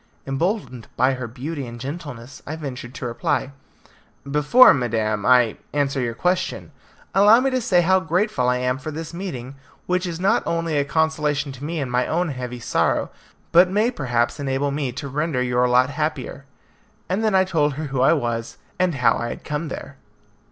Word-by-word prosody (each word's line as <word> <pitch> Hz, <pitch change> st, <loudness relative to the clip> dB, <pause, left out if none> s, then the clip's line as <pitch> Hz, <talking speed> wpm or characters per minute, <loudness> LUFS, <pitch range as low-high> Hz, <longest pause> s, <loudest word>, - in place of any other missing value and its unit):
Emboldened 135 Hz, -, -2 dB
by 130 Hz, +1 st, +3 dB
her 130 Hz, -2 st, -5 dB
beauty 135 Hz, +3 st, -5 dB
and 120 Hz, 0 st, -9 dB
gentleness, 140 Hz, -3 st, -7 dB
I 155 Hz, -, -4 dB
ventured 135 Hz, -4 st, -7 dB
to 135 Hz, -, -6 dB
reply, 120 Hz, +3 st, -1 dB, 0.8 s
"Before, 150 Hz, -, +6 dB
madam, 110 Hz, -5 st, -1 dB
I 125 Hz, -3 st, +4 dB, 0.2 s
answer 140 Hz, -2 st, 0 dB
your 120 Hz, -2 st, -2 dB
question, 180 Hz, +2 st, -1 dB, 0.4 s
allow 205 Hz, +4 st, +7 dB
me 270 Hz, +1 st, +1 dB
to 255 Hz, -1 st, 0 dB
say 180 Hz, -5 st, +3 dB
how 190 Hz, +2 st, +4 dB
grateful 170 Hz, -, 0 dB
I 125 Hz, -, +2 dB
am 125 Hz, +1 st, -1 dB
for 155 Hz, -, -6 dB
this 160 Hz, +2 st, -6 dB
meeting, 140 Hz, -8 st, -6 dB, 0.3 s
which 180 Hz, +1 st, 0 dB
is 170 Hz, -1 st, -5 dB
not 200 Hz, +6 st, +3 dB
only 165 Hz, -2 st, -1 dB
a 140 Hz, -1 st, +2 dB
consolation 150 Hz, -2 st, 0 dB
to 135 Hz, +1 st, -10 dB
me 160 Hz, +2 st, -3 dB
in 135 Hz, -4 st, -3 dB
my 125 Hz, +1 st, +1 dB
own 175 Hz, +1 st, 0 dB
heavy 125 Hz, -2 st, -5 dB
sorrow, -, -, 0 dB, 0.4 s
but 175 Hz, +2 st, +6 dB
may 210 Hz, +5 st, +2 dB
perhaps 125 Hz, -, -1 dB
enable 140 Hz, 0 st, -1 dB
me 140 Hz, -2 st, -2 dB
to 140 Hz, +3 st, -6 dB
render 150 Hz, 0 st, -1 dB
your 125 Hz, 0 st, +1 dB
lot 125 Hz, +2 st, +4 dB
happier," 145 Hz, -2 st, -3 dB, 0.6 s
and 195 Hz, +4 st, -1 dB
then 215 Hz, -3 st, +2 dB
I 190 Hz, -, +5 dB
told 155 Hz, -6 st, +1 dB
her 155 Hz, -, -4 dB
who 130 Hz, -, +1 dB
I 135 Hz, +5 st, +5 dB
was, 120 Hz, -6 st, -2 dB, 0.2 s
and 180 Hz, -3 st, +2 dB
how 125 Hz, -2 st, +3 dB
I 120 Hz, -, -3 dB
had -, -, -7 dB
come 150 Hz, +2 st, -3 dB
there. 140 Hz, -1 st, -8 dB
145 Hz, 185 wpm, -22 LUFS, 125-170 Hz, 0.8 s, allow